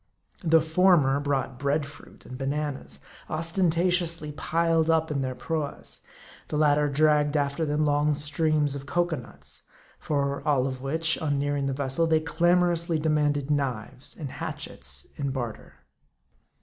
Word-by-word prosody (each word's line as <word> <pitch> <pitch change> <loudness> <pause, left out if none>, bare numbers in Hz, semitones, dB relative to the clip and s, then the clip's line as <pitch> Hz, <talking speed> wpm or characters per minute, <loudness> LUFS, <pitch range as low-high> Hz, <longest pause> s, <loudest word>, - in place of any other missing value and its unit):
The 165 -1 +5
former 160 -4 +4
brought 135 -3 -2
bread 140 +1 +1
fruit 145 - -14
and 130 - -8
bananas, 135 - -3 0.3
ostentatiously 165 -1 +1
piled 165 +2 +1
up 160 0 +2
in 140 -2 -1
their 130 -1 -3
proas; 155 +2 -4 0.5
the 150 - -2
latter 150 -1 +3
dragged 150 +1 +3
after 145 +2 0
them 150 +1 +1
long 145 0 +2
strings 150 0 +1
of 140 0 -6
cocoanuts; 145 - -3 0.4
for 140 -2 -1
all 140 -4 +2
of 130 -1 -4
which, 160 +4 +1
on 145 -3 0
nearing 145 0 0
the 135 - -1
vessel, 140 +4 0
they 160 -1 +3
clamorously 170 +1 +2
de 155 +1 0
manded 145 -1 +1
knives 130 -2 -3
and 145 -5 -6
hatchets - - -6
in 140 -1 -2
barter. 120 -4 -5
150 Hz, 140 wpm, -26 LUFS, 140-160 Hz, 0.5 s, The